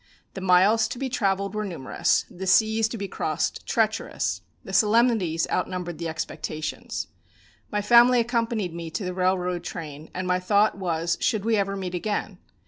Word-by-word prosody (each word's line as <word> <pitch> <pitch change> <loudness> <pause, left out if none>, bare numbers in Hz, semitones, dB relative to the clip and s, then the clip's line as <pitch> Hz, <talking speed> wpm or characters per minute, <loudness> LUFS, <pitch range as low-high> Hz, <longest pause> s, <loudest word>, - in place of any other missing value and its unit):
The 190 - -6
miles 190 +5 +4
to 245 - -6
be 265 +1 -3
travelled 200 -6 0
were 215 0 -2
numerous, 170 -10 0
the 190 +2 -7
seas 220 +3 +4
to 230 - -6
be 200 -1 -4
crossed - - -2
treacherous, - - 0 0.2
the - - -9
solemnities 215 -7 +3
outnumbered 180 -3 -2
the 170 - -3
expectations. 155 -1 -4 0.7
My 210 -1 -1
family 240 +3 +6
accompanied 230 -6 -1
me 170 -1 -6
to 185 +4 -4
the 180 - -3
railroad 180 -1 0
train, 155 -3 -7
and 185 +1 -3
my 180 0 +2
thought 205 +3 +3
was 170 -3 -1
should 215 -2 0
we 225 -1 +3
ever 200 -1 0
meet 185 -2 -4
again? 200 0 -3
195 Hz, 165 wpm, -25 LUFS, 180-220 Hz, 0.7 s, family